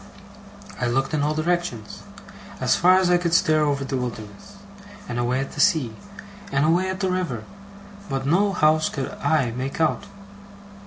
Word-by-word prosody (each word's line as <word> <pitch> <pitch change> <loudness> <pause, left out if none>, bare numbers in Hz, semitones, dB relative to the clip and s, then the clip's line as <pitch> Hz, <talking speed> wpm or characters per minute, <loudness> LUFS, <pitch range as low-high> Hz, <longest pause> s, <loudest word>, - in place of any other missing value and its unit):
I 125 - +1
looked 135 +5 0
in 150 - +1
all 150 +1 0
directions, 155 -9 -2 0.6
as - - +2
far 185 +1 +5
as 185 -1 +2
I 175 - +4
could 170 -1 0
stare 155 -3 +3
over 140 -2 0
the 135 0 -2
wilderness, 120 - -7 0.5
and 120 - -3
away 125 +2 0
at 135 - -4
the - - -9
sea, 150 - +2 0.6
and 140 +2 +2
away 175 +4 +2
at 185 +1 -4
the 190 -1 0
river, 170 -12 -2 0.7
but 135 -1 -2
no 195 +8 +2
house 155 -3 +3
could 135 -3 -4
I 145 -4 +2
make 130 +5 -5
out. 160 -1 +1
150 Hz, 170 wpm, -23 LUFS, 130-175 Hz, 0.7 s, far